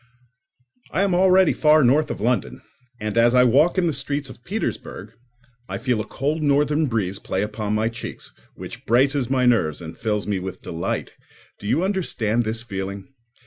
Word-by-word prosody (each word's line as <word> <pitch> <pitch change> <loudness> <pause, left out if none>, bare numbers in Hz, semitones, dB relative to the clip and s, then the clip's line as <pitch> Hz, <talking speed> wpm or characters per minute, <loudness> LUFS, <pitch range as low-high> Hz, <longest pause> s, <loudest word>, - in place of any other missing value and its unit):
I 195 - 0
am 195 -2 +1
already 185 0 +5
far 155 -1 +4
north 145 +5 +3
of - - -4
London, 120 +4 -1 0.4
and 105 +1 -1
as 120 +2 +4
I 125 - +7
walk 140 +10 +4
in 185 - +3
the 165 - +1
streets 140 0 -2
of 125 - -16
Petersburgh, 140 - -5 0.6
I - - -3
feel 120 -2 0
a - - -7
cold 150 +4 -2
northern 150 +1 +2
breeze 100 -5 -2
play 95 - -2
upon 105 0 -3
my 110 +1 +1
cheeks, 115 +1 -7 0.2
which - - -10
braces 130 +1 +2
my 130 -1 +2
nerves 110 -11 +2
and 80 -1 -8
fills 105 -2 -2
me 100 -2 -1
with 95 0 -7
delight. 85 0 -3 0.5
Do 105 - -7
you 155 - +1
understand 120 - 0
this 110 +1 -2
feeling? 100 -1 -6
120 Hz, 180 wpm, -22 LUFS, 105-150 Hz, 0.6 s, I